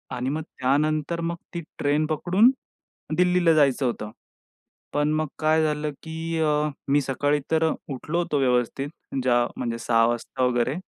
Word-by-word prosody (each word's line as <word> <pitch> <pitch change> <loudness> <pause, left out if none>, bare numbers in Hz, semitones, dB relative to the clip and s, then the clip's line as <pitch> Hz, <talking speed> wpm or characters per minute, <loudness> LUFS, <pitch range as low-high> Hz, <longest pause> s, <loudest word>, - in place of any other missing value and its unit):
आणि 125 +1 -2
मग 155 +3 -2
त्यानंतर 155 +4 0
मग 170 0 -2 0.2
ती 170 - -3 0.2
ट्रेन 145 +1 +2
पकडून 185 - +4 0.7
दिल्लीला 180 -2 +4
जायचं 140 -3 +3
होतं. 105 -3 -3 0.8
पण 145 +1 +1
मग 155 0 0
काय 155 0 +3
झालं 150 0 -1
की, 160 0 -4
अ, 150 -1 +2 0.2
मी 145 +1 +4
सकाळी 145 +2 0
तर 160 0 +3 0.2
उठलो 155 +6 -3
होतो 160 -4 0
व्यवस्थित. 125 +1 +1 0.3
ज्या 120 -1 +3
म्हणजे 115 -2 -2
6 115 -1 +3
वाजता 120 +2 -2
वगैरे. 125 +2 +1
150 Hz, 150 wpm, -25 LUFS, 130-160 Hz, 0.8 s, पकडून